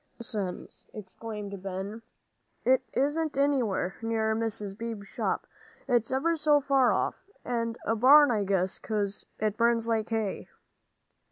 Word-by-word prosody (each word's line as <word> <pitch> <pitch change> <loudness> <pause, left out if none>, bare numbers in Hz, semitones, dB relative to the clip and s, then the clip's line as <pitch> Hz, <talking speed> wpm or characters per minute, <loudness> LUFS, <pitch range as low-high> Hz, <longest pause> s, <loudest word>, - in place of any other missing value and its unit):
"Nonsense!" 210 -6 -5
exclaimed 205 -1 -7
Ben, 195 +3 -5 0.6
"it 260 +1 +4
isn't 290 +2 0
anywhere 250 -10 +1
near 220 -1 0
Mr. 215 -3 -2
Beebe's 225 -2 -6
shop. - - -2 0.4
It's 235 -2 +2
ever 310 +6 +1
so 300 -2 +4
far 270 -2 +3
off. - - -2 0.2
And 230 -1 -2
a 225 - +1
barn, 280 +5 +7
I 210 -3 +1
guess, 190 -1 0
'cause 205 -2 -2
it 215 -1 -1
burns 235 -1 +2
like 225 -1 0
hay." 220 -3 -2
225 Hz, 135 wpm, -28 LUFS, 205-255 Hz, 0.6 s, barn